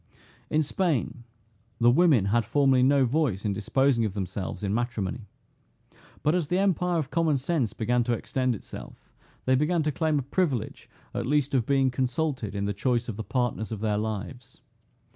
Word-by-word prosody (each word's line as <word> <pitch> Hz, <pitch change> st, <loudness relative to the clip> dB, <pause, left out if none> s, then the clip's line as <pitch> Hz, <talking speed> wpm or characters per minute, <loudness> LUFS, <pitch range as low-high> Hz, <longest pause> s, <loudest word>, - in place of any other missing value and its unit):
In 155 Hz, +1 st, +2 dB
Spain, 145 Hz, -7 st, -1 dB, 0.5 s
the 120 Hz, +1 st, +5 dB
women 140 Hz, -, +4 dB
had 115 Hz, +4 st, +2 dB
formerly 135 Hz, +2 st, +3 dB
no 135 Hz, +1 st, +4 dB
voice 125 Hz, -, 0 dB
in 100 Hz, -, +1 dB
disposing 115 Hz, +4 st, +1 dB
of 105 Hz, -3 st, -2 dB
themselves 95 Hz, +1 st, -4 dB
in 100 Hz, 0 st, -1 dB
matrimony. 115 Hz, -2 st, -2 dB, 1.0 s
But 150 Hz, -, +3 dB
as 175 Hz, -4 st, 0 dB
the 180 Hz, -, 0 dB
empire 180 Hz, -2 st, +1 dB
of 155 Hz, -4 st, -3 dB
common 165 Hz, -3 st, +2 dB
sense 135 Hz, -4 st, -1 dB
began 120 Hz, +2 st, +1 dB
to 120 Hz, -, +1 dB
extend 125 Hz, +1 st, -1 dB
itself, -, -, -11 dB, 0.3 s
they 130 Hz, -, +3 dB
began 155 Hz, +5 st, +2 dB
to 150 Hz, -, 0 dB
claim 155 Hz, +1 st, 0 dB
a 140 Hz, -, -1 dB
privilege, 140 Hz, -, -2 dB, 0.2 s
at -, -, -3 dB
least 145 Hz, -1 st, +1 dB
of 125 Hz, -4 st, +1 dB
being 135 Hz, -2 st, +3 dB
consulted 130 Hz, -4 st, -2 dB
in 100 Hz, 0 st, -1 dB
the 100 Hz, -, -1 dB
choice 120 Hz, +3 st, 0 dB
of 110 Hz, -, -4 dB
the 110 Hz, -, -5 dB
partners 120 Hz, -3 st, -2 dB
of 110 Hz, -2 st, -5 dB
their 105 Hz, -2 st, 0 dB
lives. 110 Hz, +4 st, -6 dB
125 Hz, 180 wpm, -27 LUFS, 110-150 Hz, 1.0 s, the